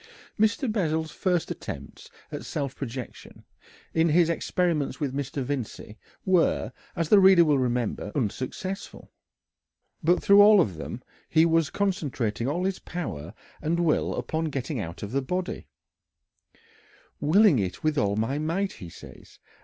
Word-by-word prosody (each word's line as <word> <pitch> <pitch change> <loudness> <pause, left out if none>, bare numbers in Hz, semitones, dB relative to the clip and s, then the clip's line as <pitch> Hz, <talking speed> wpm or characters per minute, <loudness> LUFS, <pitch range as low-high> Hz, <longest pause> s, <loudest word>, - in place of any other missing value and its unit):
Mr. 225 +5 +2
Bessel's 160 -6 -1
first 180 -3 -1
attempts - - -8 0.2
at - - -5
self 140 -2 -4
projection, 125 -2 -8 0.5
in 165 +1 +3
his 170 +1 +4
experiments 170 -3 -1
with 140 -4 -2
Mr. 135 0 -3
Vincey, 125 -5 -5 0.3
were, 185 -3 +2 0.2
as 165 -3 -1
the 210 - +7
reader 190 -3 +7
will 145 -3 +3
remember, 120 -4 -1
unsuccessful. 140 - -4 0.9
But 175 +3 +3
through 200 +1 +7
all 210 0 +8
of 95 - +1
them - - -7 0.3
he 160 0 +5
was 165 -2 +2
concentrating 140 - -1
all 170 +6 -1
his 195 0 -1
power 90 - -6 0.3
and 170 +3 0
will 165 -3 +1
upon 160 +1 -2
getting 135 -2 -3
out 85 -2 -6
of 105 - -5
the 135 +2 0
body 180 +7 -4 1.5
"willing 180 - +5
it 95 - -3
with 155 -1 +1
all 100 -7 +1
my 120 +7 -1
might," 175 +6 -1
he 90 - -10
says. - - -14
155 Hz, 145 wpm, -26 LUFS, 130-180 Hz, 1.5 s, all